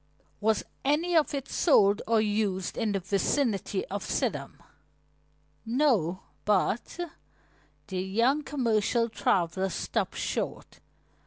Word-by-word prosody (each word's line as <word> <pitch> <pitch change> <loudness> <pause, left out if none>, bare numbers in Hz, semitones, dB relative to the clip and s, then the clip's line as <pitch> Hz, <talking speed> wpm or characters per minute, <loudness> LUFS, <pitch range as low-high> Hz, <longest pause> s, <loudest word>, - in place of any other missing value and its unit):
"Was 220 0 +1 0.2
any 320 +5 +1
of 315 -2 +4
it 275 -1 -4
sold 205 - +4
or 225 0 +4
used 205 -3 0
in 225 -3 0
the 195 - 0
vicinity 200 +1 0
of 200 +1 -3
Sidham?" 200 - -2 1.1
"No, 225 - +1 0.2
but 210 - 0 0.5
" - - -36
The 185 -1 -2
young 230 +10 +2
commercial 235 -4 +1
traveler 190 -2 +1
stopped - - -2
short. - - -3
215 Hz, 110 wpm, -28 LUFS, 195-255 Hz, 1.1 s, of